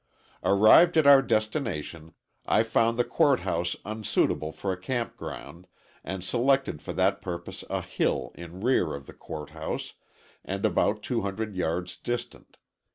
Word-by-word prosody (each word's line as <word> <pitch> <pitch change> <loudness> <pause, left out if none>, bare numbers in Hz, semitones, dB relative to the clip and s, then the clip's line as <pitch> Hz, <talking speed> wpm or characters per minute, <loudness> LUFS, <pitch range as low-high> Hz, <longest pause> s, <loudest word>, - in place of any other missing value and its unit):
Arrived 110 - +6
at 155 - +5
our 140 -1 +9
destination, 110 - -2 0.3
I - - +4
found 115 +1 +1
the 120 - +3
court 140 +2 +2
house 85 +1 -1
unsuitable 105 -7 0
for 95 +5 -3
a 90 - -9
camp 120 +4 -2
ground, 90 +2 -9 0.4
and 95 -1 -5
selected 130 - +1
for - - -6
that - - +1
purpose 85 -2 -6
a - - -1
hill 60 - -1
in 85 +2 -10
rear 105 - +2
of 70 -1 -9
the - - -12
court 75 -2 -8
house, - - -5 0.5
and - - -3
about - - +1
200 100 +1 -2
yards 90 0 -2
distant. 120 0 -5
100 Hz, 150 wpm, -27 LUFS, 85-120 Hz, 0.5 s, our